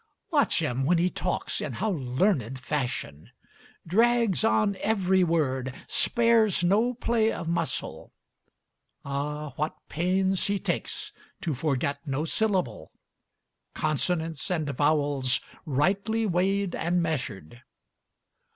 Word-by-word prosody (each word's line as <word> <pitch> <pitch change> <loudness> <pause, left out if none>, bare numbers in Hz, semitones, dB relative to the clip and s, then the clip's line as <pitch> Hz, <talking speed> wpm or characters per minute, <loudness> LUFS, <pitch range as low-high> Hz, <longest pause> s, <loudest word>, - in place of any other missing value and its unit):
Watch 230 - +3
him, 135 -3 -1
when 170 +6 +3
he 180 +2 +2
talks, - - -2
in - - -3
how 220 - -1
learned 135 - 0
fashion! 125 - -3 0.6
Drags 230 +2 +3
on 210 -2 +3
every 190 -3 +2
word, 135 -6 0
spares 230 -6 +3
no 220 +7 +3
play 230 -2 +1
of 165 - -5
muscle. 170 +1 -2 0.9
Ah, 145 +1 -3
what 155 +1 -1
pains 190 +3 +1
he 200 0 +1
takes - - -3 0.3
to 165 - -1
forget 140 0 -1
no 140 +3 -1
syllable 180 - -1 0.8
Consonants 160 +1 -1
and 160 -5 -1
vowels 145 -2 +2 0.3
rightly 200 - +1
weighed 195 0 +1
and 175 +1 0
measured. 120 - -4
170 Hz, 110 wpm, -27 LUFS, 140-200 Hz, 0.9 s, Watch